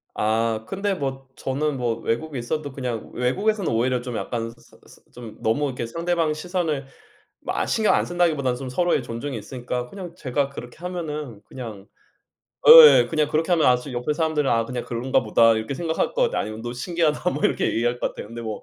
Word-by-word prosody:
아 110 Hz, +1 st, 0 dB
근데 195 Hz, +1 st, -1 dB
뭐 135 Hz, -5 st, -4 dB
저는 140 Hz, +2 st, -2 dB
뭐 120 Hz, -2 st, 0 dB
외국에 150 Hz, +5 st, -3 dB
있어도 145 Hz, +4 st, -3 dB
그냥 125 Hz, -4 st, -4 dB
외국에서는 195 Hz, -, 0 dB
오히려 125 Hz, +2 st, +1 dB
좀 125 Hz, -1 st, -6 dB
약간 115 Hz, 0 st, -3 dB
스 115 Hz, -, -21 dB
스 -, -, -18 dB
좀 120 Hz, -3 st, -10 dB
너무 115 Hz, +7 st, +1 dB
이렇게 125 Hz, -4 st, -3 dB
상대방 165 Hz, +3 st, 0 dB
시선을 160 Hz, -4 st, -2 dB, 0.6 s
뭐 -, -, -4 dB
아 -, -, 0 dB
신경 220 Hz, -2 st, +2 dB
안 -, -, +2 dB
쓴다기보다는 155 Hz, -8 st, +1 dB
좀 135 Hz, -1 st, -6 dB
서로의 175 Hz, +7 st, +1 dB
존중이 115 Hz, +2 st, -5 dB
있으니까 125 Hz, +1 st, -5 dB
그냥 180 Hz, +1 st, -9 dB
제가 140 Hz, -2 st, -1 dB
그렇게 120 Hz, -3 st, -9 dB
하면은 150 Hz, -, -5 dB
그냥 110 Hz, -6 st, -9 dB, 0.8 s
예 470 Hz, 0 st, +11 dB
그냥 155 Hz, -2 st, +1 dB
그렇게 160 Hz, +4 st, 0 dB
하면 165 Hz, -3 st, +3 dB
아 125 Hz, -, +5 dB
제 125 Hz, +2 st, -8 dB
옆에 125 Hz, +4 st, -1 dB
사람들은 150 Hz, -2 st, 0 dB
'아 115 Hz, 0 st, +2 dB
그냥 125 Hz, +1 st, -5 dB
그런가 125 Hz, +3 st, 0 dB
보다.' 115 Hz, +1 st, +4 dB
이렇게 110 Hz, +5 st, -3 dB
생각할 165 Hz, -, -1 dB
것 -, -, +1 dB
같아요. 480 Hz, -, +1 dB
아니면 110 Hz, +1 st, -6 dB
"너 120 Hz, -, -4 dB
신기하다." 155 Hz, +4 st, 0 dB
뭐 -, -, -3 dB
이렇게 -, -, +2 dB
얘기할 120 Hz, +1 st, 0 dB
것 -, -, +1 dB
같아요. -, -, -9 dB
근데 115 Hz, +2 st, -8 dB
뭐 110 Hz, -2 st, -5 dB
135 Hz, 420 characters per minute, -23 LUFS, 120-160 Hz, 0.8 s, 예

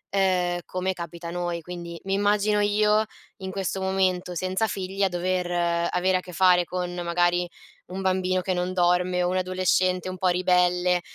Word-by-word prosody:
ehm, 180 Hz, -2 st, +1 dB
come 185 Hz, +1 st, -2 dB
capita 170 Hz, -1 st, -7 dB
a -, -, -6 dB
noi. 175 Hz, -1 st, -3 dB
Quindi 170 Hz, 0 st, -8 dB
mi 195 Hz, -, -1 dB
immagino 205 Hz, +1 st, +2 dB
io, 210 Hz, +1 st, +3 dB, 0.3 s
in 190 Hz, -1 st, -6 dB
questo 190 Hz, 0 st, -3 dB
momento 185 Hz, -2 st, 0 dB
senza 185 Hz, +5 st, 0 dB
figli 195 Hz, -1 st, -4 dB
a 195 Hz, -, +3 dB
dover 180 Hz, 0 st, -1 dB, 0.4 s
avere 185 Hz, +1 st, +2 dB
a -, -, -1 dB
che 180 Hz, -1 st, -11 dB
fare 180 Hz, -1 st, +4 dB
con 180 Hz, 0 st, -4 dB
magari 175 Hz, 0 st, +1 dB, 0.4 s
un 185 Hz, +1 st, -6 dB
bambino 185 Hz, -1 st, +1 dB
che 185 Hz, +1 st, -1 dB
non 180 Hz, 0 st, -2 dB
dorme, 180 Hz, 0 st, +2 dB
o 175 Hz, -, +1 dB
un 185 Hz, -, 0 dB
adolescente 185 Hz, 0 st, +1 dB
un 185 Hz, -, -6 dB
po' 185 Hz, -, +1 dB
ribelle, 180 Hz, 0 st, +2 dB
185 Hz, 180 wpm, -25 LUFS, 180-190 Hz, 0.4 s, fare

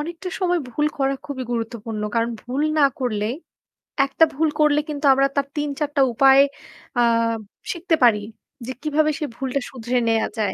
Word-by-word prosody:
অনেকটা 340 Hz, +4 st, -5 dB
সময় 355 Hz, -1 st, +2 dB
ভুল 295 Hz, +5 st, 0 dB
করা 270 Hz, 0 st, +1 dB
খুবই 275 Hz, -3 st, -5 dB
গুরুত্বপূর্ণ। 225 Hz, -2 st, -4 dB
কারণ 230 Hz, 0 st, +1 dB
ভুল 260 Hz, +4 st, -2 dB, 0.2 s
না 290 Hz, -, +6 dB, 0.2 s
করলে, 215 Hz, -4 st, -1 dB, 0.8 s
একটা 275 Hz, +4 st, +2 dB
ভুল 315 Hz, +3 st, +1 dB
করলে 300 Hz, -1 st, +4 dB
কিন্তু 295 Hz, 0 st, -3 dB
আমরা 275 Hz, +1 st, +3 dB
তার 280 Hz, -1 st, 0 dB
৩ 295 Hz, 0 st, -1 dB
৪ 295 Hz, -1 st, 0 dB
টা -, -, +5 dB
উপায় 270 Hz, +3 st, +6 dB, 0.6 s
আ -, -, +4 dB, 0.7 s
শিখতে 340 Hz, -1 st, 0 dB
পারি 230 Hz, -4 st, +5 dB, 0.5 s
যে 260 Hz, -, -4 dB
কিভাবে 305 Hz, +1 st, +1 dB
সে 300 Hz, -, -1 dB
ভুলটা 265 Hz, +2 st, -2 dB
শুধরে 250 Hz, -1 st, -2 dB
নেয়া 225 Hz, 0 st, +2 dB
যায়। 205 Hz, -3 st, 0 dB
275 Hz, 170 wpm, -22 LUFS, 235-300 Hz, 0.8 s, না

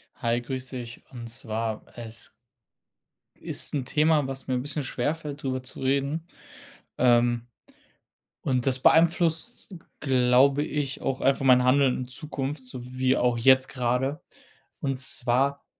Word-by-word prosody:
Hi, 115 Hz, +1 st, 0 dB
grüße 130 Hz, +1 st, -5 dB
dich. 120 Hz, -1 st, -8 dB
Und 120 Hz, -3 st, -8 dB
zwar, 115 Hz, -2 st, -4 dB
es 115 Hz, -1 st, -10 dB, 1.1 s
ist -, -, -2 dB
'n 140 Hz, -4 st, -1 dB
Thema, 150 Hz, +1 st, +2 dB
was 135 Hz, 0 st, -7 dB
mir 130 Hz, -, 0 dB
'n 125 Hz, -, -1 dB
bisschen 145 Hz, +2 st, -2 dB
schwerfällt, 145 Hz, +3 st, -3 dB
drüber 130 Hz, -1 st, -2 dB
zu 130 Hz, -, -9 dB
reden, 140 Hz, +4 st, 0 dB, 0.7 s
ähm, 120 Hz, -1 st, +3 dB, 1.0 s
und 125 Hz, -1 st, 0 dB
das 130 Hz, -1 st, +2 dB
beeinflusst, 170 Hz, -, +2 dB, 0.3 s
glaube 130 Hz, +1 st, +4 dB
ich, 145 Hz, -3 st, -3 dB
auch 130 Hz, -, -2 dB
einfach 135 Hz, 0 st, +2 dB
mein 125 Hz, -1 st, +6 dB
Handeln 130 Hz, 0 st, +4 dB
in 125 Hz, -, -5 dB
Zukunft, 140 Hz, 0 st, -5 dB
so 130 Hz, 0 st, -5 dB, 0.2 s
wie 130 Hz, 0 st, +3 dB
auch 125 Hz, -1 st, +2 dB
jetzt 130 Hz, +2 st, +5 dB
grade. 125 Hz, +4 st, -1 dB, 0.6 s
Und 135 Hz, -3 st, -2 dB
zwar 135 Hz, +2 st, 0 dB
130 Hz, 135 wpm, -26 LUFS, 125-140 Hz, 1.1 s, mein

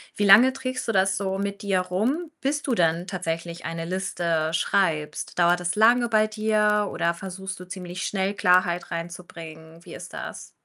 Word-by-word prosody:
wie 205 Hz, -, -1 dB
lange 235 Hz, +7 st, +8 dB
trägst 255 Hz, -2 st, -4 dB
du -, -, +1 dB
das 190 Hz, -2 st, +2 dB
so 195 Hz, -1 st, -2 dB
mit 200 Hz, 0 st, -3 dB
dir 195 Hz, -2 st, +1 dB
rum, 245 Hz, -, -2 dB
bis 290 Hz, +2 st, -1 dB
du 265 Hz, -4 st, -1 dB
dann 170 Hz, -1 st, +1 dB
tatsächlich 170 Hz, -2 st, -4 dB
eine 165 Hz, 0 st, -4 dB
Liste 170 Hz, -3 st, -1 dB
schreibst? 160 Hz, -3 st, -1 dB
Dauert 175 Hz, +1 st, +4 dB
das 175 Hz, 0 st, -2 dB
lange 235 Hz, +3 st, +4 dB
bei 215 Hz, -1 st, +3 dB
dir 215 Hz, -1 st, +1 dB
oder 170 Hz, 0 st, 0 dB
versuchst 190 Hz, +1 st, -7 dB
du 180 Hz, -, -9 dB
ziemlich 185 Hz, 0 st, -6 dB
schnell 195 Hz, 0 st, -1 dB
Klarheit 180 Hz, -2 st, +2 dB
reinzubringen? 165 Hz, -1 st, -8 dB
Wie -, -, -10 dB
ist -, -, -10 dB
das? -, -, -7 dB
185 Hz, 175 wpm, -25 LUFS, 170-210 Hz, -, lange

